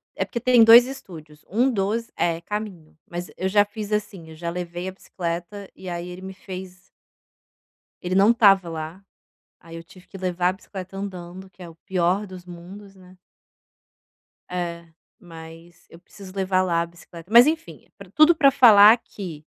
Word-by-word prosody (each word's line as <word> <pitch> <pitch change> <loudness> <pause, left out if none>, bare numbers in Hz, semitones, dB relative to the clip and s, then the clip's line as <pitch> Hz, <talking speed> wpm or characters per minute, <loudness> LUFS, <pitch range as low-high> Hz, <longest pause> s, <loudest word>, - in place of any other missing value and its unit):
é - - -1
porque 235 - -5
tem 245 -1 +5
2 235 +2 +9
estúdios. 165 - -11
Um 240 +7 +2
dos 225 +2 -2
é 165 -1 -1
caminho. 195 -6 -7
Mas 175 +1 -6
eu 190 +1 -2
já 205 +1 +4
fiz 210 0 -8
assim: 205 -6 -4
eu 160 - -12
já 170 +1 -5
levei 175 +1 -6
a - - -4
bicicleta 180 +2 -6
e 185 - -9
aí 175 0 -5
ele 180 +1 -9
me 190 0 -8
fez 185 -1 -10 1.2
Ele 180 +1 -3
não 200 +4 +5
estava 195 -6 +4
lá. 165 +4 -7 0.6
Aí, 165 0 -12
eu 165 - -10
tive 185 +2 -18
que 195 - -11
levar 180 -1 -1
a - - 0
bicicleta 190 -1 -10
andando 190 -1 -8
que 180 0 -16
é 170 - -9
o 165 - -14
pior 185 +4 -1
dos 185 -1 -12
mundos, 190 +3 -12
né. 185 0 -18 1.3
É. 170 -2 -5 0.3
Mas 165 0 -14
eu 165 - -15
preciso 190 +1 -14
levar 190 -1 +1
lá 170 -2 0
a - - -2
bicicleta. 170 +2 -15
Mas, 240 +4 +8
enfim, 325 +1 -4
pra - - -13
tudo 310 +2 +5
pra 280 -3 +4
falar 225 -4 +7
que, 170 -9 -10
185 Hz, 180 wpm, -23 LUFS, 170-205 Hz, 1.3 s, 2